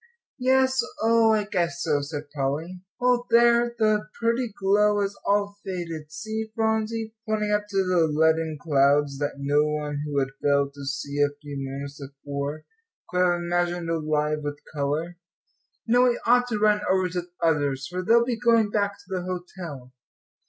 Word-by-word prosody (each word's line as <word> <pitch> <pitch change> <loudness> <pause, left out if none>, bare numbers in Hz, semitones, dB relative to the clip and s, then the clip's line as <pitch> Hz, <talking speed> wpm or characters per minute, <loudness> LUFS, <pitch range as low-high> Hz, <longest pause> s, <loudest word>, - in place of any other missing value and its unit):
"Yes, 260 +1 +3 0.2
oh, 230 0 +4
I 215 -1 +2
guess 175 -4 -1
so," 150 -3 +1
said 145 0 -6
Polly. 155 +6 -3 0.2
"Well, 245 0 +2
there, 235 0 +4
the 215 -1 +2
pretty 235 0 0
glow 205 +1 +3
has 200 0 -1
all 205 0 +1
faded; 165 -5 -5
see, 220 +6 -5
Phronsie," 220 0 -1 0.2
pointing 210 -1 0
up 210 0 0
to 195 -1 +1
the 175 -3 +3
leaden 160 +1 +1
clouds 140 -2 +2
that 145 -1 -2
no 140 +1 +2
one 150 -1 -2
who 145 -1 -3
had 135 -1 +1
failed 140 -1 +2
to 140 0 -9
see 140 +1 -3
a 145 - +4
few 145 -1 -8
moments 140 +1 -6
before 140 +2 -5 0.5
could 180 - 0
have 175 -1 +2
imagined 175 -1 -1
alive 155 -1 0
with 145 0 -4 0.2
colour. 155 +4 -2 0.7
"Now 245 +2 +4
we 245 -1 +2
ought 245 +1 +4
to 225 -3 -1
run 210 0 +3
over 185 0 +2
to 180 +1 -2
the 175 0 -19
others, 145 -4 +1
for 180 +1 -4
they'll 235 +5 +4
be 240 -2 -2
going 230 -3 +3
back 200 -1 0
to - - -18
the 190 -2 -3
hotel." 175 -7 -7
175 Hz, 170 wpm, -25 LUFS, 145-215 Hz, 0.7 s, oh